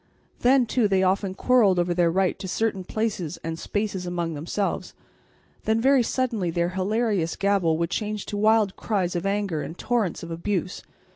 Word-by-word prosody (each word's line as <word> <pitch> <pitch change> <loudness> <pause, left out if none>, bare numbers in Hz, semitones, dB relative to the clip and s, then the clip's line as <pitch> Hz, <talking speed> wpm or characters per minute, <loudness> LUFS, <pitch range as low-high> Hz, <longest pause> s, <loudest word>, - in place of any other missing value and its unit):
Then, 255 +1 +4
too, 235 -1 +2
they 190 -1 +2
often 190 0 +1
quarrelled 220 -5 +4
over 175 0 +1
their 175 -1 +3
right 185 +1 +1
to 190 - -5
certain 195 0 -1
places 190 -6 -2
and 165 0 -4
spaces 205 -3 -3
among 170 -2 -2
themselves; 170 +7 -3 0.7
then 220 +1 +2
very 265 +2 +4
suddenly 235 -6 -1
their 170 +1 0
hilarious 190 -2 0
gabble 195 -5 +2
would 170 +1 -1
change 210 0 -2
to 205 - -5
wild 215 -1 +3
cries 190 -5 -1
of 175 +3 -1
anger 195 -6 -1
and 165 - -7
torrents 225 -9 -1
of 170 - -7
abuse. 180 +2 -2
195 Hz, 170 wpm, -25 LUFS, 175-215 Hz, 0.7 s, Then